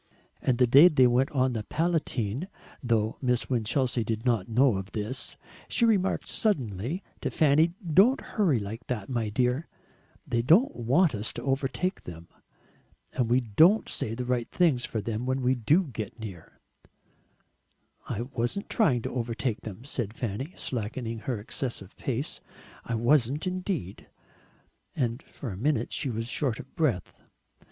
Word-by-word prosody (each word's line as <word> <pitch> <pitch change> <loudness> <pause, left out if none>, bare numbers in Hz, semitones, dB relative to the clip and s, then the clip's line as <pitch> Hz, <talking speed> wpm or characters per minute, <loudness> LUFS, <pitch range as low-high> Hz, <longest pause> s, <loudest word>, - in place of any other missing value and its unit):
And 125 -2 +1
the 125 - +5
day 140 +8 +8
they 140 -7 +5
went 125 +2 +3
on 130 -2 +1
the 110 - -2
Palatine 150 - -1 0.3
though 115 -3 0
Miss 125 -1 0
Winchelsea 120 +1 +1
did 110 +1 -3
not 115 -6 +1
know 120 -1 +4
of 95 +1 -7
this 110 +5 -4 0.3
she 235 - +2
remarked 200 -4 +1
suddenly 135 - -1 0.2
to - - -1
Fanny, 155 +3 +3
"Don't 200 - +5
hurry 190 - +1
like 110 +3 -6
that, 110 -6 -3
my 115 -4 -1
dear; 125 +7 0 0.6
THEY 120 -1 0
don't 175 - +4
want 135 +8 +3
us 105 0 -3
to - - -6
overtake 135 +7 -1
them. 85 -1 -10 0.8
And 120 -3 0
we 125 +2 +4
don't 160 - +4
say 110 - -2
the 125 +1 -4
right 125 -2 -1
things 155 -9 +2
for 110 - -3
them 115 +3 -3
when 130 0 0
we 125 +1 +3
DO 145 - +3
get 110 +1 -6
near." 95 -7 -9 1.5
"I 105 - -2
wasn't 120 +8 -3
trying 135 - +2
to - - -3
overtake 120 -1 -2
them," 110 +3 -8
said 120 -6 -4
Fanny, 125 - -4
slackening 115 0 -4
her 120 0 -3
excessive 105 -2 -4
pace; 135 +3 -3 0.4
"I 115 - -3
wasn't 130 +5 +2
indeed." 185 - -3 0.9
And 120 -1 -1
for 130 -7 -8
a - - -6
minute 145 +7 0
she 145 - -1
was 115 -1 -3
short 125 -2 -1
of 135 - -11
breath. 130 - 0
125 Hz, 155 wpm, -28 LUFS, 115-145 Hz, 1.5 s, day